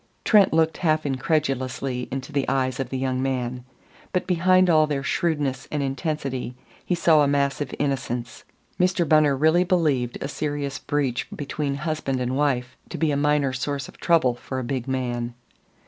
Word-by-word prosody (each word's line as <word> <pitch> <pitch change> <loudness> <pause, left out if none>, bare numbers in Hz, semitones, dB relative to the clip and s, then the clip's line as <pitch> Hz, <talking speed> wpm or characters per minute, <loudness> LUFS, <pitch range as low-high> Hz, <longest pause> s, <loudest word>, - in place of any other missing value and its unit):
Trent 210 -3 +5
looked 160 0 +2
half 155 -3 +1
incredulously 135 -2 -1
into 135 +2 -5
the 140 -2 0
eyes 130 -1 0
of 130 -2 -2
the 130 - -3
young 130 -1 -1
man. 125 -2 -2 0.5
But 180 - 0
behind 185 +1 +4
all 155 -3 +4
their 140 -2 -2
shrewdness 145 -5 -1
and 145 -2 -1
intensity 135 -2 -3 0.3
he 180 - 0
saw 165 -3 +4
a 145 - +3
massive 140 -1 0
innocence. 125 -4 -3 0.4
Mr. 180 -2 +2
Bunner 150 -3 +4
really 160 +5 +4
believed 150 -10 +1
a - - -3
serious 145 -1 -3
breach 140 -4 -1
between 145 0 -3
husband 150 -3 -2
and 125 +1 -1
wife 130 -3 0
to - - -5
be 160 -2 +1
a - - +1
minor 145 -2 +2
source 140 +1 -3
of - - -15
trouble 160 -8 +3
for 130 +2 -7
a 130 - -2
big 125 0 -3
man. 120 -2 -2
140 Hz, 170 wpm, -24 LUFS, 130-155 Hz, 0.5 s, Trent